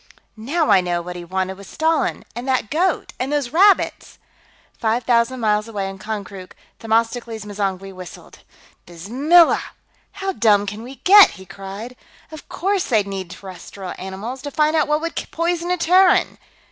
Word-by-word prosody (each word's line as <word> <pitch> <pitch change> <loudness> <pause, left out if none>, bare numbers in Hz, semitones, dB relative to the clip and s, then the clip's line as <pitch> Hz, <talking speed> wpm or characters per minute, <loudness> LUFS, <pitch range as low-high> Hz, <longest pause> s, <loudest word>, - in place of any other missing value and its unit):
"Now 290 +9 0
I 190 - +6
know 175 -1 -1
what 180 +1 -7
he 175 - -7
wanted 190 +2 -3
with 200 - -12
Stalin, 320 +1 0
and 240 +2 -6
that 255 -5 0
goat, 350 +2 0
and 260 +3 -2
those 285 -4 -1
rabbits!" 385 +4 +2 0.6
Five 230 +2 0
thousand 235 +1 +1
miles 210 0 +1
away, 205 -4 -4
in 195 0 -8
Konkrook, 200 -3 -7 0.2
Themistocles 225 0 -1
M'zangwe 195 -2 -4
whistled. 185 -2 -12 0.5
"Bismillah! 260 - +3 0.5
How 390 0 -3
dumb 210 - +3
can 210 +2 -6
we 255 +4 -9
get?" 400 +1 +9
he 190 - -12
cried. 195 +6 -9 0.4
"Of 310 -1 -11
course 390 0 -1
they'd 215 -4 +1
need 195 -3 -6
terrestrial 190 0 -9
animals, 200 +8 -6
to 285 - -5
find 305 +2 +1
out 310 -2 +2
what 300 +1 +1
would 335 0 -4
poison 340 +1 -2
a 360 - +1
Terran! 365 +2 +3
230 Hz, 160 wpm, -20 LUFS, 195-310 Hz, 0.6 s, get